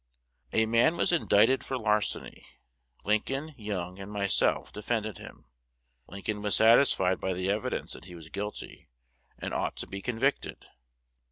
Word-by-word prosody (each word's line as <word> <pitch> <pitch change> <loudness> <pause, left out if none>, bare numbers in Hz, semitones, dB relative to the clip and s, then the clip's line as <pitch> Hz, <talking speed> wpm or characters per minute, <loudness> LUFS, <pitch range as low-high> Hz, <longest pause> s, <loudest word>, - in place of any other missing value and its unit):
"A 110 - +3
man 115 +9 +3
was - - +2
indicted 130 -6 +4
for 130 - -3
larceny: 105 -3 -1 0.6
Lincoln, 135 +9 -1
Young, 95 -5 -5
and 100 +1 -8
myself 100 -1 +1
defended 110 -2 -3
him. - - -13 0.6
Lincoln 105 +2 -4
was 105 -1 +1
satisfied 110 -5 +5
by 95 - -1
the 95 +2 -1
evidence 105 +1 -2
that - - -10
he 90 -1 -10
was 80 -2 -11
guilty, 105 +3 -6 0.5
and - - -5
ought - - -1
to - - -4
be 100 0 -7
convicted. 125 +6 -1
105 Hz, 145 wpm, -29 LUFS, 95-115 Hz, 0.6 s, satisfied